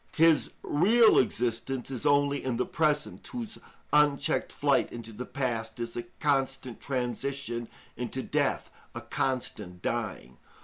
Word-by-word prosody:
His 165 -1 +4
real 220 +9 +5
existence 125 +1 -1
is 135 +3 -1
only 145 0 +3
in 130 -3 -1
the 125 - +1
present, 150 -2 0
whose 235 -3 -6 0.3
unchecked 150 -2 +3
flight - - +2
into 115 -1 -8
the 125 +4 -6
past 115 -5 -2
is 115 0 -4
a 120 - -1 0.2
constant 135 -4 0
transition 125 -1 -2 0.3
into 125 +2 -3
death, - - 0 0.2
a - - -4
constant 105 -9 -2
dying. 110 - -3
130 Hz, 130 wpm, -29 LUFS, 120-145 Hz, 0.3 s, real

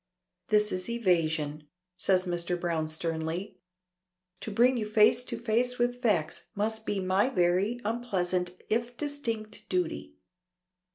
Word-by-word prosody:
"This 210 -1 +3
is 185 +3 -3
evasion," 160 -9 0 0.3
says 185 0 +2
Mr. 175 0 -1
Browne 165 -3 -1
sternly. 160 +4 -3 0.8
"To - - -5
bring 240 +5 +4
you 215 -2 -2
face 215 +3 +5
to - - -4
face 240 +2 +1
with 245 +1 0
facts 190 -11 0
must 220 +2 -2
be 205 - 0
my 190 +5 +2
very 190 +2 +2
unpleasant 185 -6 -1
if 235 +2 -1
distinct 235 -8 -4
duty. 70 - -2
200 Hz, 125 wpm, -29 LUFS, 175-230 Hz, 0.8 s, face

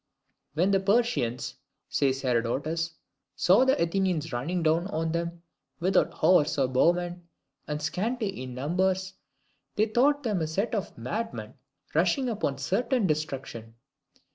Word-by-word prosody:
"When 180 +5 +3
the 195 - +4
Persians," 195 - +1 0.3
says 135 -1 0
Herodotus, 140 +7 -1 0.4
"saw 195 +9 +5
the 265 - +3
Athenians 170 -3 0
running 165 +9 -1
down 165 +3 +2
on 165 -4 -2
them, 170 0 -3 0.4
without 185 +3 +2
horse 165 -6 +3
or 135 -2 +3
bowmen, 175 +6 +1 0.4
and 150 +1 -2
scanty 195 - -2
in 130 -1 -6
numbers, 185 +7 0 0.6
they 215 - +3
thought 280 +6 +2
them 210 -7 0
a 160 - 0
set 195 +10 -1
of 200 -6 -3
madmen 215 - -4 0.4
rushing 265 -3 +2
upon 200 - -1
certain 215 - 0
destruction." 135 -8 -3
170 Hz, 130 wpm, -28 LUFS, 145-200 Hz, 0.6 s, saw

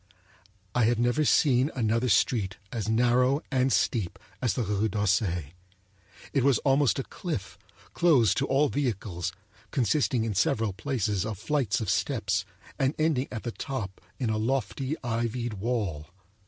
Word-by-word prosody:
I 120 -2 +3
have 120 +1 +2
never 120 +6 +2
seen 135 -2 +4
another 115 0 +1
street 100 -1 +2
as 110 -2 -3
narrow 125 +5 +3
and 130 -1 +2
steep 100 -7 0 0.2
as 125 -4 +1
the 125 - 0
Rue 105 +1 0
d'Auseil. 95 - 0 0.8
It 135 -4 +2
was 135 -3 +4
almost 135 -1 +3
a 135 - -1
cliff, 140 - -5 0.3
closed 145 -10 +4
to 135 - +1
all 140 +3 +3
vehicles, 100 -11 -2 0.4
consisting 130 -2 +1
in 110 - -1
several 110 - +1
places 105 -3 -1
of 110 -2 -4
flights 120 -5 0
of 110 - -2
steps, 100 -9 0 0.3
and 135 +1 +1
ending 155 -4 +1
at 110 - -5
the 120 - -3
top 110 -8 -5 0.2
in 120 -4 -1
a 110 - 0
lofty 135 +4 -1
ivied 120 0 -2
wall. 100 -8 -2
120 Hz, 150 wpm, -28 LUFS, 105-135 Hz, 0.8 s, seen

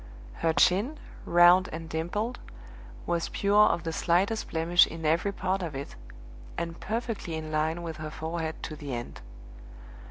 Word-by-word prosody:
Her 165 - +3
chin, 195 - +3 0.3
round 175 +2 +6
and 165 0 -6
dimpled, 190 +10 -3 0.7
was 170 -1 -1
pure 205 +1 +4
of 170 0 0
the 165 -1 -3
slightest 190 +7 +1
blemish 165 +2 +4
in 165 -1 -7
every 165 +6 +2
part 190 0 -2
of 165 -5 -4
it, 135 - -6 0.6
and 170 0 -4
perfectly 225 -6 -3
in 155 -1 -5
line 160 +2 0
with 165 -2 -5
her 155 -1 -5
forehead 160 +1 -4
to 155 - -5
the 140 -4 -5
end. 120 0 -7
170 Hz, 155 wpm, -28 LUFS, 160-185 Hz, 0.7 s, round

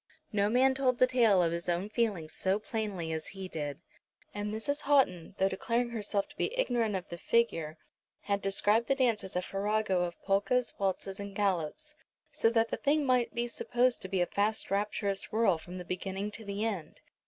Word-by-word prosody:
No 205 0 +2
man 260 +3 +4
told 260 -2 +1
the 255 - +6
tale 230 -7 +4
of 165 - +1
his 170 +1 -3
own 175 +3 0
feelings 210 -8 -1
so 190 +1 +1
plainly 210 -6 -3
as 160 -1 -3
he 190 -1 -5
did. 150 -3 -5 0.5
And 205 0 -3
Mrs. 225 +7 -2
Houghton, 225 - +2
though 190 - +3
declaring 235 +5 -1
herself 205 -3 -1
to 290 - -15
be 480 +4 -1
ignorant 235 - +1
of 185 - -4
the 170 - -7
figure, 165 -10 +1 0.4
had 200 -1 -1
described 205 +4 +2
the 275 - +3
dance 245 -5 +2
as 190 - -8
a 180 - 0
farrago 200 -1 0
of 175 -1 -3
polkas, 210 +5 +2
waltzes, 195 0 -2
and 200 -1 -6
galops, 200 - -1 0.4
so 225 - +3
that 230 0 +2
the - - -2
thing 290 +1 +2
might 250 -2 +2
be 240 0 0
supposed 245 +1 +1
to - - -5
be 190 -1 +1
a - - +4
fast 210 +3 -1
rapturous 200 -1 -1
whirl 215 -6 +3
from 180 +3 -9
the 180 - -7
beginning 195 +3 -3
to 220 - -7
the 200 +1 -3
end. 195 -8 -4
205 Hz, 200 wpm, -31 LUFS, 185-235 Hz, 0.5 s, the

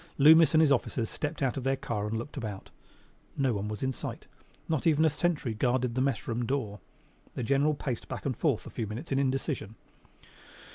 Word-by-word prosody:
Loomis 160 +2 +7
and 155 - +7
his 155 -3 +4
officers 120 -3 0
stepped 145 -1 -3
out 130 0 0
of 135 - -3
their 135 +1 +2
car 105 -5 -3
and 110 +1 -2
looked 120 +6 -6
about. 105 -8 -6 0.7
No 135 -3 +2
one 100 0 -2
was 105 +2 -5
in 130 - +1
sight. - - -6 0.4
Not 160 0 0
even 160 0 +4
a 160 - +4
sentry 150 -5 0
guarded 125 +2 0
the 130 - 0
mess 135 -3 0
room 120 +1 -1
door. 115 -5 -2 0.6
The 125 - -3
General 140 +5 +2
paced 130 -4 -4
back - - -6
and 135 -3 0
forth 140 -3 0
a - - -9
few 115 -3 -3
minutes 120 +11 -7
in 135 - +2
indecision. 135 -5 -1
130 Hz, 205 wpm, -29 LUFS, 115-145 Hz, 0.7 s, Loomis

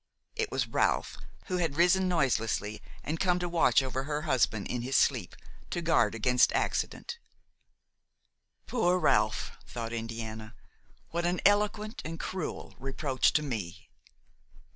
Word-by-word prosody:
It 450 -2 -1
was - - 0
Ralph, - - 0 0.3
who 185 -3 -1
had 165 -5 0
risen 180 +2 +4
noiselessly 115 - 0 0.2
and 160 +2 -3
come 180 -2 +3
to 180 0 -2
watch 170 -5 +4
over 130 0 -3
her 150 +1 -2
husband 125 -8 +1
in 125 - -2
his 130 +3 +1
sleep, - - +1 0.3
to - - -2
guard 160 -11 +2
against 125 +3 +4
accident. 470 - -2 1.5
"Poor 185 -7 +2
Ralph!" 170 - +2 0.2
thought 115 -1 -5
Indiana; 115 -1 -5 0.6
"what 170 +1 0
an 175 +1 0
eloquent 210 +2 +2
and 165 +1 -6
cruel 185 -3 -4
reproach 135 0 +1
to 155 - +2
me!" 100 - -5
150 Hz, 135 wpm, -30 LUFS, 115-180 Hz, 1.5 s, risen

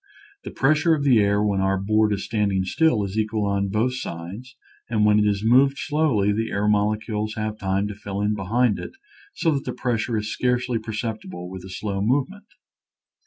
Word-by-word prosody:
The - - -6
pressure 155 +4 +2
of 145 - -3
the 130 -5 +5
air 100 0 +2
when 100 -2 +1
our 95 0 +1
board 105 +2 +2
is 100 -1 -2
standing 100 -4 0
still 105 - +2
is 100 +2 -3
equal 110 -1 -1
on 100 0 0
both 110 +6 0
sides, 100 +6 -7 0.3
and 110 -3 +2
when 105 0 +5
it 105 - +3
is 100 0 0
moved 135 +4 +4
slowly 145 -10 +1
the 110 +2 -1
air 100 +1 -1
molecules 105 +1 0
have 110 0 -3
time 95 +1 0
to 105 - -5
fill 100 -1 -6
in 105 +1 +1
behind 105 +3 +1
it - - -7 0.4
so 165 - +1
that 140 -2 -1
the - - -4
pressure 115 -2 -1
is 105 0 -3
scarcely 125 -1 0
per 110 0 -7
ceptible 110 -5 -5
with 95 -1 -8
a 95 - -10
slow 100 +1 -3
movement. 145 - -1
105 Hz, 200 wpm, -23 LUFS, 100-120 Hz, 0.4 s, the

